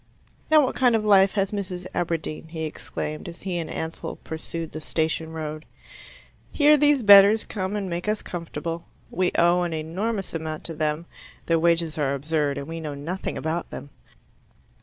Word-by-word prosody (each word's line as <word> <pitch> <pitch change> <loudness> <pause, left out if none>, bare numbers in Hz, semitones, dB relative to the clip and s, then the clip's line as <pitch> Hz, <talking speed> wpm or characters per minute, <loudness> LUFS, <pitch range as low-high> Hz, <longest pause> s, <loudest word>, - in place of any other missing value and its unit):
"Now 310 -2 +6
what - - -3
kind 245 -3 +4
of 220 - +1
a - - -3
life 195 -1 +6
has 195 -2 0
Mrs. 185 -3 -4
Aberdeen?" 165 -2 -2
he 160 0 -5
exclaimed, 155 0 -5
as 170 - -11
he 180 -2 -2
and 165 - -4
Ansell 160 0 -4
pursued 160 0 -5
the 155 - -6
Station 160 +1 -1
Road. 155 -1 -5 0.9
"Here 300 0 +5
these 290 -3 +3
bedders 205 +1 +8
come 190 -1 -3
and 200 -2 -2
make 175 +2 -4
us 215 0 -1
comfortable. 165 -1 -5 0.3
We 180 0 +1
owe 175 +1 +4
an 175 -2 -1
enormous 190 +7 -3
amount 155 -1 -4
to 165 - -5
them, 155 +1 -1 0.4
their 165 -1 +2
wages 165 -1 +1
are 140 -1 +1
absurd, 145 0 -1
and 140 - -4
we 165 0 -5
know 150 -3 -5
nothing 165 +7 -4
about 160 +2 -3
them. 140 - -8
170 Hz, 180 wpm, -25 LUFS, 160-195 Hz, 0.9 s, bedders